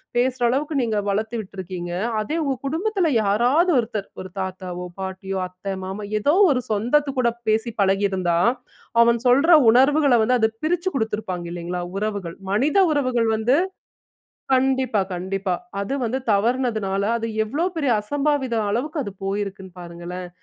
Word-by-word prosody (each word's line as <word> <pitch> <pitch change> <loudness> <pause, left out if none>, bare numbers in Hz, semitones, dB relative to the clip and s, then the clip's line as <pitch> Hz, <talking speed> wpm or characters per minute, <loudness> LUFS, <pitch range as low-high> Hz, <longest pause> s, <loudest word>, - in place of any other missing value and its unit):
பேசுற 250 +1 +1
அளவுக்கு 290 +5 -1
நீங்க 225 -3 0
வளர்த்து 220 +3 -1
விட்டுருக்கீங்க. 185 -3 -7 0.3
அதே 215 +9 -2
உங்க 275 -2 0
குடும்பத்தில 350 +3 0
யாராவது 245 - +3
ஒருத்தர் 220 -4 -2
ஒரு 185 - -8
தாத்தாவோ! 185 -1 -5
பாட்டியோ! 190 0 -4
அத்தை, 185 +2 -6
மாமா 195 +2 -5
எதோ 285 +8 +2 0.2
ஒரு 255 -2 +1
சொந்தத்து 245 +8 +2
கூட 240 -2 +3 0.2
பேசி 225 +2 +1
பழகியிருந்தா, 190 -3 +1 0.7
அவன் 235 0 +3
சொல்ற 280 +7 +4 0.2
உணர்வுகள 275 +3 +4
வந்து 250 +3 +3
அத 220 0 +3 0.2
பிரிச்சு 355 +3 0
கொடுத்துருப்பாங்க 210 -7 -2
இல்லேங்களா! 175 +1 -4
உறவுகள் 200 -5 -3
மனித 275 - +2 0.2
உறவுகள் 255 -5 +1
வந்து 240 +5 +2 1.0
கண்டிப்பா, 260 -4 +2
கண்டிப்பா. 190 +1 -2 0.3
அது 200 +7 -3
வந்து 250 +4 -1
தவறினதுனால 215 -3 0 0.2
அது 230 - -3 0.2
எவ்ளோ 295 +10 -1
பெரிய 285 -5 +1
அசம்பாவித 280 0 0
அளவுக்கு 285 +7 -1
அது 200 - -6
போயிருக்குன்னு 195 -2 -4
பாருங்களேன்! 175 +1 -7
220 Hz, 135 wpm, -22 LUFS, 190-265 Hz, 1.0 s, சொல்ற